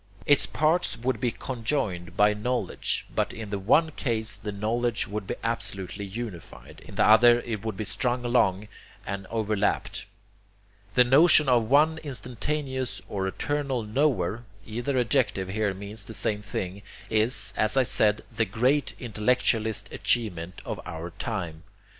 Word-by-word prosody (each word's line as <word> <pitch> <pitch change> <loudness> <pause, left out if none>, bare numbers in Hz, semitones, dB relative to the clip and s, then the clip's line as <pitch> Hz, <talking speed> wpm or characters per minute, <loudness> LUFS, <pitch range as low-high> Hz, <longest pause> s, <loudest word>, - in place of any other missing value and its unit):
Its 145 - +4
parts 155 +3 +1
would 120 -1 -1
be 125 - +2
conjoined 115 -9 -3
by 105 0 +5
knowledge, 110 -1 -2
but - - 0
in 110 -3 -8
the 100 - -2
one 155 +11 +3
case 110 -6 -2
the 105 - -6
knowledge 115 +3 -1
would 100 -1 -5
be - - -2
absolutely 105 -4 -2
unified, 100 -3 -8
in - - -11
the - - +3
other 120 +2 +7
it 110 -4 -5
would 110 -3 -4
be 110 - -2
strung 120 +4 -1
along 105 -4 +2 0.4
and 100 -1 -5
overlapped. 105 -2 -1 0.9
The 125 - +7
notion 150 +4 +6
of 120 -3 +3
one 155 +4 +4
instantaneous 130 -4 -3
or 95 -1 -2
eternal 140 +3 -2
Knower 110 - 0 0.2
either 120 +5 -2
adjective 115 -6 +1
here 105 +1 0
means 100 +2 -6
the 110 +2 -9
same 105 -1 0
thing 100 -2 -5 0.3
is, 110 +3 +2
as 110 +4 +2
I 135 - +6
said, 110 -4 +3
the 110 - +2
great 125 +8 +1
intellectualist 110 -1 0
achievement 95 -6 0
of - - -4
our 85 +1 -6
time. 85 -9 -4
110 Hz, 145 wpm, -26 LUFS, 100-125 Hz, 0.9 s, other